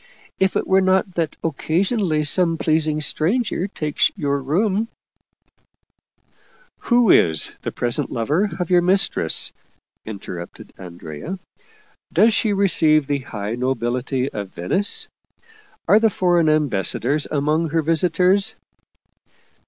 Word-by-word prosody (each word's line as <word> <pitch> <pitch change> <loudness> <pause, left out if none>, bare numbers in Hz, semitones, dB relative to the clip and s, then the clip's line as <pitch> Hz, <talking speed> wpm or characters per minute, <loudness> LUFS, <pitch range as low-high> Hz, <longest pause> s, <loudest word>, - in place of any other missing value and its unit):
If 190 0 +1
it - - 0
were 190 0 +3
not 190 +1 +1
that 165 -3 -3
occasionally 165 - 0
some 165 +2 +2
pleasing 155 -1 0
stranger 185 - 0
takes 150 -7 0
your 140 -1 -1
room 195 - 0 0.6
" - - -45
" - - -34
Who 240 -4 +5
is 80 -3 +3
the - - -4
present 120 -1 -2
lover 150 - 0
of 180 0 -3
your 175 -1 +5
mistress? 190 +3 +1 0.3
" - - -42 0.3
interrupted 95 -5 -9
Andrea. 85 - -8 0.7
"Does 225 +1 +4
she 215 - +1
receive 160 -7 +3
the 145 0 -1
high 105 -5 -6
nobility 125 +1 -2
of 100 -2 -5
Venice? 200 - -1 0.8
Are 210 - +6
the 225 0 +3
foreign 175 -4 +2
ambassadors 145 0 0
among 155 +3 0
her 165 +1 0
visitors 180 +4 +1
160 Hz, 120 wpm, -21 LUFS, 135-190 Hz, 0.8 s, Are